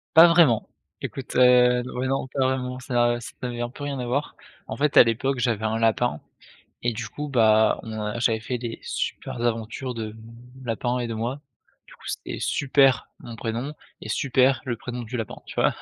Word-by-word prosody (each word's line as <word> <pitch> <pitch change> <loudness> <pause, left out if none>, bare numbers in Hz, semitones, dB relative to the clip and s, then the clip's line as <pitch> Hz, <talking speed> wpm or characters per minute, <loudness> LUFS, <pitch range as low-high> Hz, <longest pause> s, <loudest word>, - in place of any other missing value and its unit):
Pas 165 +2 +10
vraiment, 165 -10 +4 0.3
écoute, 135 - -6
heu 125 -1 +5 0.2
ouais, 130 - 0
non 135 0 -1
pas 140 - -8
vraiment, 130 -1 -1
ça 120 -2 +1
ça 120 - -9
n'avait 120 -1 -3
un 120 - -2
peu 130 +4 -11
rien 140 -1 -3
à 125 - -3
voir. 140 +5 -2 0.3
En - - -4
fait 145 0 0
à - - +11
l'époque 125 +3 0
j'avais 115 -3 0
un 110 0 0
lapin, 115 -6 +1 0.6
et 120 0 +1
du 110 -1 -5
coup, 150 +7 -6
bah, 110 -4 +4
on 110 -2 -4
j'avais 115 -2 +2
fait 125 +3 -4
des 120 -1 -5
super - - -4
aventures 120 +2 -2
de 110 -2 -5 0.5
lapin 120 +1 -1
et 120 - -2
de 115 - -4
moi, 120 +6 -3 0.5
du - - -16
coup - - -16
c'était - - -5
Super, 135 -3 +3
mon 120 -1 -9
prénom 115 +6 -3 0.3
et - - -6
Super 130 -1 +2
le 120 -2 -1
prénom 125 +1 -6
du 115 +2 -5
lapin, 115 -3 -4
tu - - -9
vois? - - +2
120 Hz, 195 wpm, -25 LUFS, 115-130 Hz, 0.6 s, à